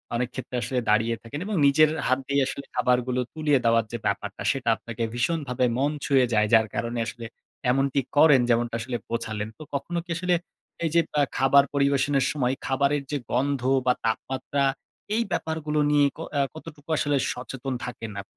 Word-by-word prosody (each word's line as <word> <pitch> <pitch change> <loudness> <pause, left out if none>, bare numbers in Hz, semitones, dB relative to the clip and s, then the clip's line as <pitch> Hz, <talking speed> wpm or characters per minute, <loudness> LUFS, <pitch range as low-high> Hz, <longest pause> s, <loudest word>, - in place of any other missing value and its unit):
অনেক 125 +1 0
ক্ষেত্রে 130 -1 -6
আসলে 125 +2 -1
দাঁড়িয়ে 110 +2 +3
থাকেন 115 +5 -7
এবং 210 -1 -2
নিজের 155 +2 +5
এ - - -3
হাত 130 +1 +2
দিয়ে 140 0 +2
আসলে 140 - -5
খাবারগুলো 125 0 +1
তুলিয়ে 150 -3 +2
দেওয়ার 115 -1 +4
যে 120 - -2
ব্যাপারটা - - -2
সেটা 130 -3 -2
আপনাকে 115 0 -6
ভীষণভাবে 125 0 0
মন 140 +3 +1
ছুঁয়ে 135 -3 +4
যায়। 105 0 +3
যার 110 -1 +6
কারণে 120 0 -2
আসলে 115 +1 -7 0.5
এমনটি 135 +1 +1 0.2
করেন 145 -4 +7
যেমনটা 120 0 +1
আসলে 120 +1 -3
বোঝালেন। 110 -2 -3
তো 155 - -9
কখনো 155 +5 -2
কি - - -34
আসলে 180 0 +1 0.5
এই - - +1
যে 170 - +7 0.2
আ - - +5 0.2
খাবার 135 +1 +6
পরিবেশনের 140 -1 +2
সময় 130 -4 0
খাবারের 140 +2 +1
যে 145 - 0
গন্ধ 135 +1 +1 0.2
বা 125 - +4
তাপমাত্রা 130 +4 -1 0.5
এই 230 - +2
ব্যাপারগুলো 160 -2 -1
নিয়ে 145 -1 +5
ক - - -14 0.2
আ - - +4
কতটুকু 155 -1 -12
আসলে 145 -1 +1
সচেতন 130 +1 -5
থাকেন 115 -3 -6
আপ - - -15
135 Hz, 180 wpm, -25 LUFS, 120-145 Hz, 0.5 s, করেন